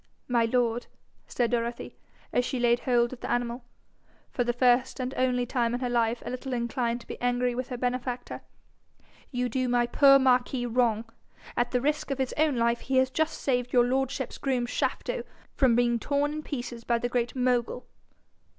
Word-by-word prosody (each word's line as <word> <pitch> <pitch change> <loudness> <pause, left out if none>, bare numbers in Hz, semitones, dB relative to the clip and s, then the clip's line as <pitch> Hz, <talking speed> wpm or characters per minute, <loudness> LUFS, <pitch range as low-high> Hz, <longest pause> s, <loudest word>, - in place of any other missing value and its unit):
'My 235 -2 +2
lord,' 240 0 0 0.4
said 240 -1 0
Dorothy, 235 0 -2 0.4
as 245 - +3
she 255 0 -3
laid 240 0 +3
hold 240 -1 +1
of 250 - -9
the - - -6
animal, 240 0 -1 0.7
for 245 - 0
the 240 - +1
first 250 +2 +2
and 255 +1 -3
only 250 -1 +1
time 240 -1 0
in - - -3
her 250 -1 -2
life 235 0 +1
a - - -4
little 255 +1 -5
inclined 235 0 -1
to - - -16
be - - -8
angry 245 0 +1
with 250 +1 -4
her 250 - -4
benefactor, 250 0 -3 0.9
'you 250 -2 -1
do 255 +1 -1
my 240 0 +3
poor 275 +3 +6
Marquis 255 -1 +2
wrong. 235 -2 +1 0.5
At 240 0 +1
the 250 -1 0
risk 300 +2 -1
of 275 - -1
his 265 -2 -1
own 305 -2 +2
life 235 0 +1
he 265 0 -1
has 260 0 +3
just 315 +2 -1
saved 250 -2 -1
your 245 -1 +5
lordship's 265 0 -2
groom, 255 -3 0
Shafto, - - -2 0.3
from 255 -4 +3
being 240 -1 +2
torn 290 +4 0
in 305 - -4
pieces 240 -5 -6
by 235 0 +1
the 245 - -1
Great 240 0 -1
Mogul.' 250 -1 0
245 Hz, 190 wpm, -27 LUFS, 240-260 Hz, 0.9 s, poor